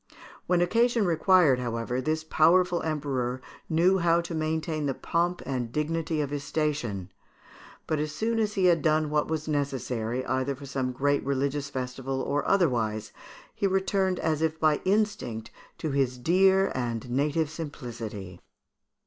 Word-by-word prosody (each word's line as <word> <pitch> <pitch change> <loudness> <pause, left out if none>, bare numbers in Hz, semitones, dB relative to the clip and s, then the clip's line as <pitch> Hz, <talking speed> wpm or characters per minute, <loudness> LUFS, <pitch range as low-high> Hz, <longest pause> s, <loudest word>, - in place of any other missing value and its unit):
When 180 -1 +3
occasion 230 +4 +2
required, 170 -5 +4
however, 120 +1 -2
this 155 +3 -1
powerful 175 +3 +3
Emperor 135 -5 -2 0.3
knew 180 +4 +3
how 170 -1 +3
to 170 0 -6
maintain 155 -1 -1
the 135 - -1
pomp 175 +1 -1
and 125 -4 -3
dignity 155 +2 -1
of 145 -1 -3
his 145 -1 -3
station; 145 - -2 0.7
but 155 - -1
as 150 0 -2
soon 225 +9 -1
as 210 -1 0
he 190 -2 +2
had 170 -2 +4
done 155 -1 +2
what 150 0 +1
was 155 -1 -3
necessary, 130 -4 -2
either 130 +1 -1
for 140 +2 -10
some 130 -1 -2
great 145 +3 +1
religious 140 +1 -1
festival 130 0 -4
or 145 +2 -1
otherwise, 115 - +1 0.4
he 200 - 0
returned, 190 -1 +1
as 155 -2 0
if 160 0 0
by 155 -2 +3
instinct, 190 - 0 0.3
to 155 - -3
his 135 -2 0
dear 190 +7 +3
and 120 -1 -3
native 145 +4 0
simplicity. 115 - -7
150 Hz, 150 wpm, -27 LUFS, 130-170 Hz, 0.7 s, required